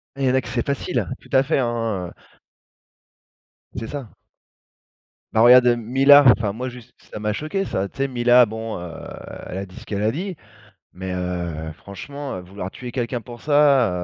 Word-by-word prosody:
Ah, 140 - -7
il - - +2
y - - +4
en 130 - +1
a 130 - +3
que - - -11
c'est 120 -2 -2
facile. 140 +5 -1
Tout - - -19
à 130 -1 +5
fait, 135 - +1
hein, 115 -6 -1
heu - - -10 1.6
C'est 115 +1 -4
ça. 140 -5 -6 1.3
Bah, 110 - +4
regarde, 125 +1 +8
heu, 120 - +5
Mila, 135 +5 +6
enfin 105 -3 -2
moi, 125 +4 -4
juste, 120 -1 -13 0.2
ça - - -6
m'a 105 0 -1
choqué, 155 - -2
ça. 95 +1 -2
Tu - - -23
sais, 135 - +1
Mila, 125 -1 +5
bon, 110 -1 -5
heu, 85 -1 -7 0.6
elle 90 - -6
a 100 - -4
dit 90 -1 -16
ce - - -11
qu'elle 100 -1 -3
a 110 - +2
dit, 180 +3 -5 0.6
mais 95 0 -6
heu, 85 -3 -3
franchement, 140 - -8
heu, - - -5
vouloir 95 +1 -7
tuer 125 -1 -8
quelqu'un 120 -1 -2
pour 120 +2 -11
ça, 145 -6 +4
120 Hz, 200 wpm, -22 LUFS, 100-135 Hz, 1.6 s, regarde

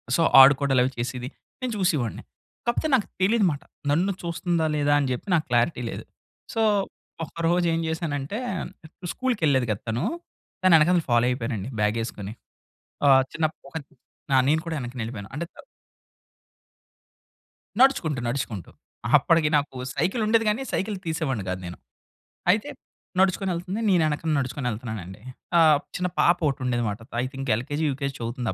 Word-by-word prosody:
So, 170 - +2 0.2
ఆడుకోవడా‌లవి 135 -2 +5
చేసేది, 125 +1 -3 0.3
నేను 255 -2 -2
చూసేవాడిని. 155 - 0 0.4
కాకపోతే 240 +6 0
నాకు 220 - 0
తెలీదనమాట 190 -7 +2 0.3
నన్ను 180 +6 +2
చూస్తుందా? 170 -1 -1
లేదా? 145 0 +2
అని 140 - 0
చెప్పి 125 - -4
నాకు 155 - +1
క్లారిటీ 120 +3 +2
లేదు. - - -6 0.5
సో, 225 - 0 0.6
ఒక్కరోజేం 170 +1 +1
చేశానంటే 160 +2 -3 0.8
స్కూల్‌కెళ్ళేది 155 - +1
కదా! 100 - -3
తనూ. 115 +3 -1 0.6
తను 185 -2 +6
ఎనకాల 170 +4 +4
నేను 160 - -7
ఫాలో 120 +1 +4
అయిపోయానండి 115 -3 -3
బ్యాగేసుకొని. 105 -1 -2 0.7
ఆహ్, 135 -1 +7
చిన్నప్పుడు 155 -3 -2
ఒకత్ 160 -4 -7 0.5
ఆ! - - +6
నేను 160 +1 +3
కూడా 165 - -3
వెనక్క 125 0 -6
నెళ్ళిపోయాను. 110 -3 -6
అంటే 165 +4 -3
త - - -14 2.2
నడుచుకుంటూ, 165 - +3
నడుచుకుంటూ. 120 - -3 0.5
అప్పటికి 155 +1 +3
నాకు 140 -2 -3 0.2
సైకిల్ 185 - 0
ఉండేది 225 0 +3
గానీ, 215 +5 0
సైకిల్ 205 +1 -1
తీసేవాడిని 140 - -2
కాదు 95 0 -3
నేను. 85 - -7 0.7
అయితే 215 +9 +2 0.5
నడుచుకొనెళ్తుంది. 190 +1 0
నేనెనకన 160 -3 +2
నడుచుకొని 130 0 -3
వెళ్తున్నానండి. 105 -4 -6 0.4
ఆహ్, 155 -3 +6 0.2
చిన్న 180 0 -1
పాప 170 - +5
ఒకటి 135 0 -3
ఉండేది 120 -1 0
అనమాట 105 0 -2 0.2
ఐ - - -1
థింక్ 135 0 -6
ఎల్‌కె‌‌జి, 145 +6 -2
యుకెజి 140 0 -3
చదువుతుంది 120 -1 -3
145 Hz, 135 wpm, -25 LUFS, 125-170 Hz, 2.2 s, ఆహ్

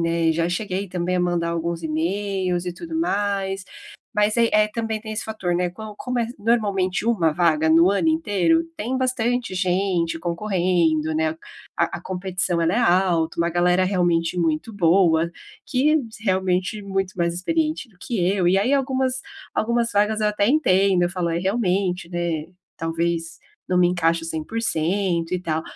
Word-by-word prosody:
né, 165 -1 +1
já 165 +1 0
cheguei 190 +1 -3
também 180 0 -1
a - - +1
mandar 175 -1 0
alguns 170 0 -3
emails, 180 +3 -1
e 180 - -3
tudo 325 - -5
mais. 200 - -1 0.5
Mas 210 +2 +2
aí, 230 -1 +4
eh, 210 0 +4
também 225 -1 -2
tem 215 0 -7
esse 215 - -3
fator, 205 -5 -3
né, 180 +1 +1
com 210 +4 -9
como 250 -1 -3
é 235 - +1
normalmente 205 -4 0
uma 180 -10 +2
vaga 160 -2 +2
no 165 +3 +6
ano 200 +11 +1
inteiro, 320 - +2
tem 255 -1 -3
bastante 245 -4 -1
gente 180 -2 0
concorrendo, 170 -3 0
né. 160 0 0 0.4
A - - 0
a - - -14
competição 180 -1 -2
ela 165 +1 +2
é 225 - +1
alta, 175 -6 +2
uma 170 0 +1
galera, 180 +2 +3
realmente 175 -2 +1
muito 165 +5 -1
boa, 170 -3 +3 0.4
que 300 +5 +3 0.3
realmente 190 +1 0
muito 195 -1 -2
mais 170 -1 0
experiente 310 - -1
do 185 - -27
que 185 -2 -1
eu. 185 -2 +2
E 185 - +4
aí 210 +8 +2
algumas, 265 -2 0 0.3
algumas 235 +1 0
vagas, 210 +1 +2
eu 210 - +3
até 210 -1 +1
entendo, 195 - +3
eu 175 - +1
falo 175 -1 -2
é 165 0 -1
realmente, 185 -2 0
né, 170 -3 -2 0.3
talvez 165 0 -2 0.3
não 180 - +1
me 180 -1 +5
encaixe 170 -2 +1
100% 170 0 -1
e 180 - -2
tal. 160 -2 -1
185 Hz, 170 wpm, -23 LUFS, 170-215 Hz, 0.5 s, no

